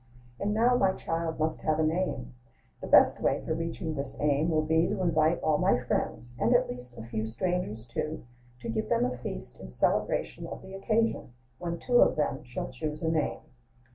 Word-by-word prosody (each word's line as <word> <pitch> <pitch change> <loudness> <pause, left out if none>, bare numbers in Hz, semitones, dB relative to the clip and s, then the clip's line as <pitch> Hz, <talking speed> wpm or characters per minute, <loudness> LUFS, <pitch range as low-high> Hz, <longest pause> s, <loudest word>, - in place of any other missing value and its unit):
And 205 - 0
now 235 +4 +4
my 195 -6 +3
child 165 -2 -3
must 155 0 -1
have 155 -1 +1
a 160 - +2
name: 155 - -1 0.5
The - - -5
best - - +6
way - - +2
for 160 - 0
reaching 165 0 -3
this 140 -1 -4
aim 150 +2 +2
Will 155 -1 +2
be, 160 +2 +3
to - - -2
invite 160 -1 +3
all 155 -1 +3
my - - +4
friends, 120 0 -2
and, - - +3
at - - +4
least, 125 0 -8
A 110 - -6
few 110 -1 -3
strangers, 115 - -2
too, 155 +6 -4 0.4
to - - -5
give 110 -1 -2
them - - +3
a 125 0 -2
feast 120 - -7
In 65 - -9
celebration 60 - 0
Of - - -8
the 190 - -10
occasion; 215 - 0 0.3
When 170 -1 -3
two 245 +6 +3
of - - +5
them 150 -3 -1
Shall 120 -1 -5
choose 150 +5 -4
a 160 - +2
name. 160 -2 0
155 Hz, 200 wpm, -29 LUFS, 125-170 Hz, 0.5 s, best